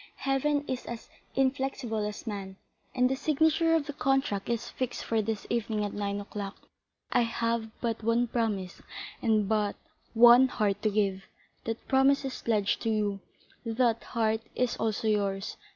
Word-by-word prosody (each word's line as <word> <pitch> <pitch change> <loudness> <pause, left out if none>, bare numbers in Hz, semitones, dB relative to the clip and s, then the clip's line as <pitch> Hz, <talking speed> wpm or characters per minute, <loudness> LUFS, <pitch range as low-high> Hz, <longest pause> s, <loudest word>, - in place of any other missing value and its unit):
Heaven 285 +2 0
is 255 -1 -4
as 235 -1 -7 0.3
inflexible 260 -4 0
as 210 +2 -7
man, 200 -3 -5 0.4
and 250 0 +4
the 260 - 0
signature 320 +3 +2
of 315 -3 +1
the 290 - -5
contract 270 -8 0
is 235 -1 -1
fixed 255 -2 -4
for 225 -1 +1
this 215 0 -3
evening 220 -3 -1
at 205 - -4
nine 200 -1 -2
o'clock. 200 -1 -6 0.5
I - - +4
have 230 -1 -1
but 230 -1 -1
one 230 +2 +2
promise 215 -6 -2 0.4
and 215 -3 +2
but 210 -1 +1 0.4
one 240 +3 +8
heart 205 -5 0
to 215 - +2
give; 195 -2 0 0.4
that 225 0 -4
promise 270 +1 +4
is 265 - -5
pledged 210 -3 +1
to 225 - -1
you, 210 -2 0 0.4
that 230 0 +1
heart 220 -1 0
is 250 -1 +1
also 220 0 -1
yours. 200 -2 0
225 Hz, 160 wpm, -29 LUFS, 210-255 Hz, 0.5 s, one